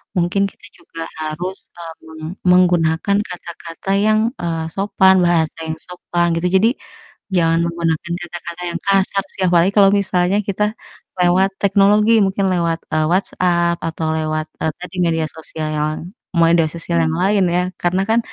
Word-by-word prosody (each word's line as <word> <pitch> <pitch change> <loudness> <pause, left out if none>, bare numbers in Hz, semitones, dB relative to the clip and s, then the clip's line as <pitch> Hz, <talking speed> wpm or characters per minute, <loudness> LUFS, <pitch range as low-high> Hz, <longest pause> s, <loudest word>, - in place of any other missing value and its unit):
mungkin 180 +2 +1
kita - - -19
juga 165 -1 -11 0.2
harus, 175 +5 -4 0.2
eee, 165 -1 -7
meng 160 0 -11 0.3
menggunakan 175 +1 +3
kata-kata 170 +1 -7
yang, 215 0 +3 0.2
eee, 165 -2 -2
sopan, 195 -1 +3
bahasa 165 -2 +1
yang 160 0 -4
sopan 175 -1 -2
gitu. 165 +2 0
Jadi 225 +3 +4 0.7
jangan 165 -1 +3
menggunakan 170 0 -2
kata-kata 170 0 -8
yang 170 - -4
kasar 195 0 +2
sih, - - -7
apalagi 175 +2 +3
kalau 195 -1 +7
misalnya 190 -1 +1
kita 200 +1 -1 0.6
lewat 180 +2 +3
teknologi, 205 +2 +4
mungkin 195 0 -1
lewat, 170 -2 0
eee, 155 - +2
WhatsApp 175 -2 +1
atau 160 0 -3
lewat, 155 0 -2 0.2
eee, 160 - +1
tadi 180 +1 -9
media 165 -1 0
sosial 155 0 -6
yoang 155 +1 -2 0.3
media 165 0 +4
sosial 170 +1 -3
yang 160 - -1
lain 195 -1 +3
ya, 180 - +2 0.2
karena 180 +2 +1
kan 230 +1 +4
175 Hz, 150 wpm, -18 LUFS, 165-190 Hz, 0.7 s, kalau